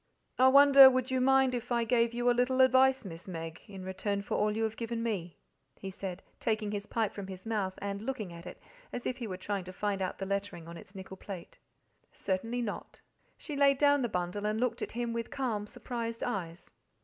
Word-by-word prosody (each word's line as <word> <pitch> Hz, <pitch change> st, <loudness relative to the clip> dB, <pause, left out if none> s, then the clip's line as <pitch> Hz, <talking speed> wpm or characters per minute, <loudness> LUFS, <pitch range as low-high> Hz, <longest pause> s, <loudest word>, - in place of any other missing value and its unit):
"I 260 Hz, -, +7 dB
wonder 275 Hz, 0 st, +9 dB
would 255 Hz, 0 st, -1 dB
you 260 Hz, 0 st, +1 dB
mind 265 Hz, 0 st, +4 dB
if 245 Hz, 0 st, -4 dB
I 235 Hz, -1 st, +2 dB
gave 230 Hz, 0 st, +2 dB
you 240 Hz, +1 st, -2 dB
a 245 Hz, -, +6 dB
little 250 Hz, +2 st, +2 dB
advice, 260 Hz, -1 st, +5 dB
Miss 165 Hz, -1 st, -9 dB
Meg, 165 Hz, -2 st, -6 dB
in 195 Hz, -2 st, -9 dB
return 200 Hz, +2 st, -2 dB
for -, -, -5 dB
all 210 Hz, 0 st, +1 dB
you 225 Hz, -, 0 dB
have 220 Hz, 0 st, -1 dB
given 230 Hz, 0 st, -3 dB
me," 180 Hz, -8 st, -3 dB, 0.4 s
he 195 Hz, -, -6 dB
said, 190 Hz, -1 st, -6 dB, 0.2 s
taking 215 Hz, -2 st, -1 dB
his 205 Hz, 0 st, -4 dB
pipe 225 Hz, -4 st, -1 dB
from 200 Hz, -2 st, -6 dB
his 190 Hz, 0 st, -9 dB
mouth 205 Hz, -4 st, -1 dB
and 200 Hz, 0 st, -4 dB
looking 220 Hz, -7 st, -4 dB
at 170 Hz, +1 st, -10 dB
it -, -, -9 dB, 0.3 s
as 245 Hz, -, -5 dB
if 255 Hz, -, -2 dB
he 240 Hz, -3 st, -5 dB
were 185 Hz, -3 st, -5 dB
trying 195 Hz, 0 st, -3 dB
to 185 Hz, -, -7 dB
find 200 Hz, +1 st, -2 dB
out 185 Hz, -, -2 dB
the 195 Hz, -, -4 dB
lettering 200 Hz, -4 st, -3 dB
on 170 Hz, -, -8 dB
its 190 Hz, +4 st, -12 dB
nickel 190 Hz, 0 st, -8 dB
plate. 185 Hz, -3 st, -9 dB, 0.5 s
"Certainly 225 Hz, +6 st, -2 dB
not." 210 Hz, -, -6 dB, 0.4 s
She 300 Hz, -, -7 dB
laid 280 Hz, -1 st, +4 dB
down 285 Hz, 0 st, +4 dB
the 240 Hz, -, 0 dB
bundle 180 Hz, +2 st, -2 dB
and 215 Hz, +1 st, -1 dB
looked 240 Hz, -1 st, -1 dB
at -, -, -4 dB
him 235 Hz, 0 st, -2 dB
with 230 Hz, -1 st, -3 dB
calm, 225 Hz, -6 st, -2 dB
surprised 230 Hz, 0 st, -5 dB
eyes. 170 Hz, -3 st, -4 dB
220 Hz, 220 wpm, -31 LUFS, 190-245 Hz, 0.5 s, wonder